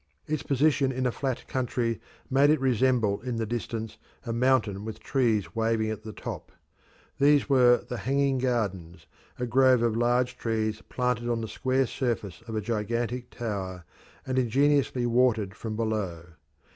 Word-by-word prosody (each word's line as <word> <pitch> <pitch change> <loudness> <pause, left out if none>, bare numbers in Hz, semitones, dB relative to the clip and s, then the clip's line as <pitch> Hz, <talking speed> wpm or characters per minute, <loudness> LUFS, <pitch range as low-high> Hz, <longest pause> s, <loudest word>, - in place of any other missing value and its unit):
Its 155 -3 -2
position 140 -1 +2
in 130 0 -2
a 125 - +2
flat 130 0 -3
country 120 -3 -1 0.3
made 140 +2 +4
it 155 - +4
resemble 125 -5 +2
in 125 0 -3
the 115 -1 -1
distance 115 -1 -4 0.3
a 115 - -2
mountain 115 -5 +2
with 110 0 -6
trees 115 -7 0
waving 110 -1 +1
at 110 -1 -5
the 110 0 -8
top. - - -7 0.7
These 145 0 +4
were 125 -3 +4
the 125 - -4
"hanging 135 +4 +1
gardens," 95 -10 -2 0.3
a 125 - -2
grove 130 0 +4
of 115 -2 +1
large 120 +2 +1
trees 110 -1 -1
planted 125 -1 -1
on 115 -1 0
the 110 - -4
square 130 +4 0
surface 115 -8 -3
of 110 - -5
a 110 - 0
gigantic 115 +3 -2
tower, 95 -6 -4 0.4
and 130 0 0
ingeniously 135 +1 +2
watered 120 -5 +2
from 110 +1 -5
below. 105 -7 -2
120 Hz, 160 wpm, -27 LUFS, 110-130 Hz, 0.7 s, made